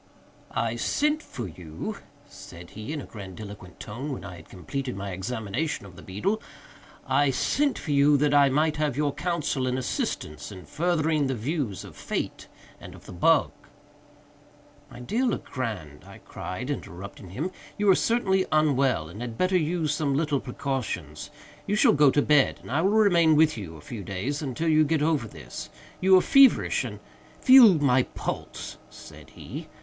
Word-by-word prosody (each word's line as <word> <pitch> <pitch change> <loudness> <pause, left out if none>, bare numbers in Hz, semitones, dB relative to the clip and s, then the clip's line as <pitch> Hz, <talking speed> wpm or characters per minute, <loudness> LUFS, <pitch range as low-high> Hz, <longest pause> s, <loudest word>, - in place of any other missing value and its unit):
"I 115 +1 0
sent 300 - +1
for 120 - -7
you," 85 - -7 0.3
said 85 -11 -12
he, 110 +5 -7
in 155 -2 -3
a - - -9
grandiloquent 100 -2 -10
tone, 130 +8 -6
when 130 - -6
I 90 0 -8
had 80 - -15
completed 125 +8 -5
my 100 0 -5
examination 110 - -3
of 95 -2 -13
the - - -12
beetle, 105 - -2 0.6
"I 145 -1 +3
sent 280 - +1
for 155 - -5
you, 145 +1 +5
that 145 +1 +2
I 140 -1 +6
might 150 +3 +1
have 150 -4 -1
your 145 -1 +1
counsel 155 -7 -1
and 125 0 0
assistance 75 - -3
in 95 -3 -10
furthering 155 -3 +1
the 135 - -1
views 125 - -3
of - - -12
Fate - - -4 0.3
and - - -11
of - - -16
the - - -10
bug—" 145 - +3 1.4
"My 125 -3 -11
dear 220 - -1
Legrand," 110 - -3
I - - -13
cried, 90 +10 -6
interrupting 95 -6 -7
him, 150 - -3 0.3
"you 205 - 0
are 195 - +8
certainly 190 -5 +1
unwell, 140 - +2
and 100 +8 -9
had 120 -2 -5
better 185 +1 +1
use 165 -2 +1
some 145 -3 0
little 150 -3 +1
precautions. 120 - -4 0.4
You 205 - +1
shall 215 - +5
go 145 -1 +5
to 145 +2 +2
bed, 150 -3 +3
and - - -9
I 150 +4 +2
will 190 - +3
remain 175 -7 +4
with 155 0 +4
you 90 -7 -7
a - - -13
few 105 +6 -7
days, 100 - -3
until 145 +3 -3
you 155 -1 +5
get 155 0 +1
over 150 -7 +1
this. - - -9 0.3
You 190 0 +6
are - - +5
feverish 275 +4 +5
and—" - - -7 0.4
"Feel 255 -7 +8
my 130 -3 +3
pulse," - - -6
said - - -13
he. 155 +3 -9
140 Hz, 175 wpm, -26 LUFS, 105-160 Hz, 1.4 s, are